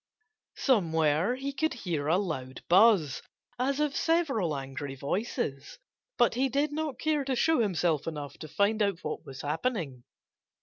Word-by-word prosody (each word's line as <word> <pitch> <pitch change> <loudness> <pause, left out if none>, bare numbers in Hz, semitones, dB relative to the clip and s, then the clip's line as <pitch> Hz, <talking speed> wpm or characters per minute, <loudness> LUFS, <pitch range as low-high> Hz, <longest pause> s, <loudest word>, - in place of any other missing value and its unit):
Somewhere 165 - +2
he 275 +2 -4
could 315 0 0
hear 170 - -3
a 165 +3 +4
loud 135 -10 -4
buzz, 185 - +5 0.4
as 275 +3 0
of 300 -2 0
several 270 - +1
angry 135 +1 -6
voices. 145 - -3 0.4
But 240 - +4
he 265 +3 +1
did 285 +3 +1
not 300 -3 -3
care 305 -1 0
to 265 -1 -1
show 320 +4 +3
himself 175 -8 +1
enough 145 -4 -5
to 155 - -7
find 205 +7 +1
out 200 -4 0
what 155 - -4
was 135 -1 -8
happening. 150 - -2
200 Hz, 155 wpm, -29 LUFS, -, 0.4 s, buzz